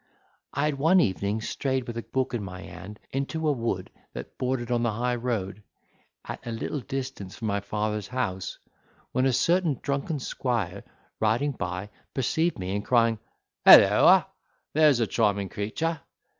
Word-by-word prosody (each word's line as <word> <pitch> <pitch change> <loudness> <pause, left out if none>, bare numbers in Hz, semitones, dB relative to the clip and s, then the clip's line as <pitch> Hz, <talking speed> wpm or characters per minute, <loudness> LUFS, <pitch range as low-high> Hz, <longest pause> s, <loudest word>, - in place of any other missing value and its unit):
'I 140 - +1
had 150 -2 0
one 165 +6 +5
evening 100 - 0
strayed, 130 +2 -2
with 120 - -6
a 115 - -3
book 130 +3 -2
in 115 -4 -2
my 90 -1 -7
hand, 105 +2 -10
into 155 +4 -2
a - - +4
wood 115 -8 -2 0.2
that - - -8
bordered 125 -2 -1
on 120 -1 +2
the 115 -2 +1
high 125 +3 0
road, 110 -5 -2 0.6
at - - -6
a - - -6
little 115 +6 -3
distance 130 -7 -5
from 115 - -4
my 100 0 0
father's 105 0 -2
house, 95 -8 -3 0.5
when 130 +1 +2
a - - +3
certain 170 +2 +2
drunken 140 +2 -1
squire, 110 -8 -2 0.4
riding 115 +7 +2
by, 95 -3 -5 0.2
perceived 160 +6 +1
me, 95 0 -3
and 105 - -2
crying, 115 -2 +3 0.4
"Holloa, - - +8 0.5
there's 150 -4 +5
a 115 - +3
charming 100 -2 +1
creature!" 160 +11 -2
120 Hz, 160 wpm, -27 LUFS, 105-135 Hz, 0.6 s, Holloa